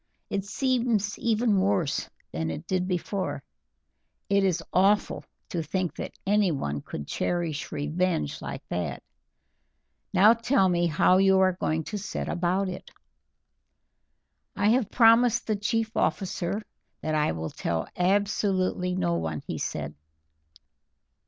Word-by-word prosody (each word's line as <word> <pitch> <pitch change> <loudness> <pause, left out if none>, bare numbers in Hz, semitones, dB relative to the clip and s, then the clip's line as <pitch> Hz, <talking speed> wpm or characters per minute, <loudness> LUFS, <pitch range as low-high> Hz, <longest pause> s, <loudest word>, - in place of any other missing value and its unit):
It 195 -1 -1
seems 235 -3 0
even 225 -2 +2
worse 190 -7 0 0.2
than 80 +1 -2
it 150 - -5
did 185 0 -1
before; 190 +2 -2 0.9
it 200 0 +3
is 180 -3 +1
awful 200 +3 +2 0.3
to 175 -6 -2
think 180 +2 -2
that - - -6
anyone 170 - +1
could 75 - -7
cherish 170 - -2
revenge 145 - -1
like - - -7
that. 75 -7 -3 1.1
Now 200 +4 +7
tell 230 -4 +2
me 175 -1 +2
how 170 +3 +4
you 190 0 +5
are 190 -1 +4
going 160 -3 -1
to 210 +6 -5
set 200 - -4
about 180 +3 0
it." 180 - -7 1.7
"I 205 - +2
have 235 -2 +2
promised 230 0 +5
the 215 - 0
chief 220 +3 -1
officer 195 +1 -1 0.4
that 155 - -2
I 150 - +2
will 80 0 -4
tell 80 -1 -2
absolutely 185 -1 +1
no 85 - 0
one," 80 -3 -3
he - - -4
said. 75 0 -3
185 Hz, 130 wpm, -27 LUFS, 155-205 Hz, 1.7 s, Now